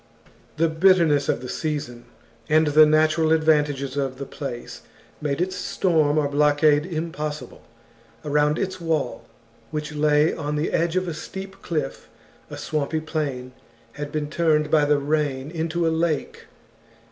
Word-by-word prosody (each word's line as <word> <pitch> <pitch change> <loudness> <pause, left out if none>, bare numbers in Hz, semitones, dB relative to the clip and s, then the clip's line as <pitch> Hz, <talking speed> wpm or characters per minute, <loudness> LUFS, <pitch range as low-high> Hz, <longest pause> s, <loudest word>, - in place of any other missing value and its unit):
The 165 +1 +3
bitterness 160 -3 +3
of - - 0
the 125 - -6
season, 140 -6 -4 0.4
and 155 +1 +4
the 155 +1 +6
natural 155 +1 +3
advantages 150 -4 +2
of 135 -2 -2
the 140 - -5
place, 135 -4 -7 0.4
made 145 -1 -1
its 185 +1 -1
storm 155 -7 +1
or 150 -2 +2
blockade 145 +1 +3
impossible. 155 -3 -5 0.6
Around 150 +1 +2
its 185 -1 -3
wall, 160 -3 -2 0.4
which 150 +1 -4
lay 150 +1 +3
on 150 -1 -3
the 150 +2 -1
edge 170 +1 0
of 185 0 0
a 170 - -3
steep 190 +5 -8
cliff, 150 -5 -4 0.4
a - - -7
swampy 155 +1 -2
plain 145 -5 -4 0.4
had 145 +3 -6
been 150 -1 -2
turned 155 -1 +1
by 150 -2 +4
the 145 0 +3
rain 145 -1 -1
into 165 0 -1
a 160 - +1
lake. 160 -2 -2
150 Hz, 145 wpm, -23 LUFS, 145-160 Hz, 0.6 s, the